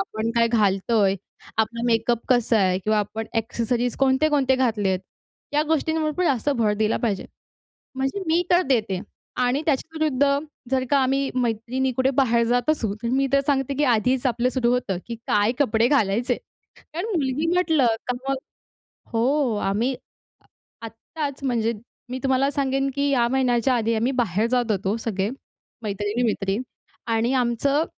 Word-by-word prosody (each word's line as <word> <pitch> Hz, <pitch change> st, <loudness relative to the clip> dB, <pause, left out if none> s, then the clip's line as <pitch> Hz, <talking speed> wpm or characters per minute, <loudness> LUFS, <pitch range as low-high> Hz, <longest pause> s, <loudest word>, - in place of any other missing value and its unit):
आपण 225 Hz, -, -2 dB
काय 230 Hz, 0 st, +4 dB
घालतोय. 205 Hz, -2 st, +2 dB, 0.4 s
आपला 230 Hz, +1 st, 0 dB
मेकअप 235 Hz, 0 st, +2 dB
कसा 240 Hz, -3 st, +3 dB
आहे 185 Hz, -1 st, +2 dB
किंवा 215 Hz, +2 st, +1 dB
आपण 215 Hz, +2 st, -3 dB
एक्सेसरीज 235 Hz, +2 st, -1 dB
कोणते-कोणते 270 Hz, 0 st, +3 dB
घातलेत, 210 Hz, -7 st, +1 dB, 0.6 s
या 300 Hz, -, +4 dB
गोष्टींवर 315 Hz, 0 st, +1 dB
पण 365 Hz, -, +1 dB
जास्त 275 Hz, -1 st, +1 dB
भर 215 Hz, -2 st, +2 dB
दिला 220 Hz, 0 st, +1 dB
पाहिजे. 205 Hz, -4 st, -1 dB, 0.7 s
म्हणजे 270 Hz, +8 st, -1 dB
मी 330 Hz, +2 st, +3 dB
तर 350 Hz, +1 st, +5 dB
देते 215 Hz, -8 st, +1 dB, 0.5 s
आणि 255 Hz, +4 st, +1 dB
त्याच्याविरुद्ध 300 Hz, -1 st, +1 dB, 0.4 s
जर 260 Hz, -1 st, +2 dB
का 285 Hz, -, +5 dB
आम्ही 270 Hz, +1 st, +1 dB
मैत्रिणी 245 Hz, +2 st, -1 dB
कुठे 260 Hz, +1 st, +3 dB
बाहेर 235 Hz, -4 st, +3 dB
जात 245 Hz, +4 st, +1 dB
असू, 225 Hz, -10 st, +1 dB
तर -, -, -1 dB
मी 270 Hz, +2 st, +2 dB
तर 275 Hz, -, +5 dB
सांगते, 275 Hz, -1 st, +1 dB
की 295 Hz, -, +1 dB
आधीच 250 Hz, +1 st, +2 dB
आपलं 245 Hz, +1 st, +1 dB
सुरू 245 Hz, -2 st, +1 dB
होतं, 220 Hz, -7 st, -1 dB
की 235 Hz, -, -4 dB
काय 210 Hz, +2 st, +3 dB
कपडे 230 Hz, -3 st, +3 dB
घालायचे. 235 Hz, -4 st, +1 dB, 0.6 s
कारण 345 Hz, +5 st, -3 dB
मुलगी 280 Hz, 0 st, 0 dB
म्हटलं 320 Hz, -8 st, +3 dB, 0.2 s
का 250 Hz, -, 0 dB
मग 275 Hz, -, +2 dB, 0.8 s
हो, 245 Hz, +1 st, +1 dB
आम्ही 210 Hz, +6 st, 0 dB, 0.9 s
आत्ताचं 275 Hz, +5 st, -6 dB
म्हणजे 230 Hz, -2 st, 0 dB, 0.4 s
मी 255 Hz, -, -3 dB
तुम्हाला 270 Hz, +1 st, +2 dB
सांगेन, 270 Hz, -1 st, 0 dB
की 280 Hz, 0 st, +1 dB
या 240 Hz, -4 st, +3 dB
महिन्याच्या 255 Hz, -1 st, +2 dB
आधी 230 Hz, -1 st, 0 dB
आम्ही 230 Hz, +4 st, +1 dB
बाहेर 210 Hz, +1 st, 0 dB
जात 245 Hz, -2 st, +1 dB
होतो. 195 Hz, +1 st, 0 dB
सगळे 200 Hz, -3 st, -2 dB, 0.5 s
मैत्रिणी-मैत्रिणी 205 Hz, 0 st, -1 dB, 0.5 s
आणि 230 Hz, +3 st, +1 dB
आमचं 260 Hz, +4 st, +1 dB
245 Hz, 150 wpm, -23 LUFS, 225-270 Hz, 0.9 s, तर